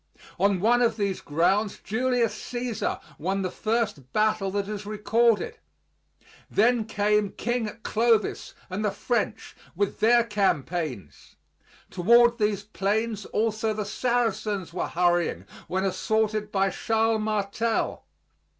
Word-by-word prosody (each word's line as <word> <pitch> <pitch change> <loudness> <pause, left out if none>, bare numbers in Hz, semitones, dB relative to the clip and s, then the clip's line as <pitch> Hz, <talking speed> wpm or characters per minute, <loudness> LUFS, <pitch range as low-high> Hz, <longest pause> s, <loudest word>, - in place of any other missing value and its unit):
On 200 -1 +3
one 240 +5 +3
of 235 -2 +2
these 200 -3 -1
grounds 185 +7 +1
Julius 245 0 0
Cæsar 245 -2 -3 0.2
won 195 +4 -1
the 185 - -2
first 215 - -2
battle 215 -2 +1
that 200 0 -2
is 210 -1 -5
recorded. 215 +2 +1 0.9
Then 235 +1 +3
came 210 -1 +1
King 235 -2 -2
Clovis 225 -1 +1
and 195 +3 -4
the 210 - +2
French, 220 +2 -2 0.2
with 200 +2 -1
their 235 +2 +5
campaigns; 170 - -2 0.6
toward 235 +6 +4
these 210 -1 0
plains 210 +1 -1
also 220 0 0
the 210 -1 -3
Saracens 215 -5 -1
were 180 - -2
hurrying 175 -1 +1 0.2
when 190 +1 -1
assaulted 210 +3 0
by 195 -1 +1
Charles 225 +1 +1
Martel. 215 +1 -1
210 Hz, 120 wpm, -26 LUFS, 195-225 Hz, 0.9 s, their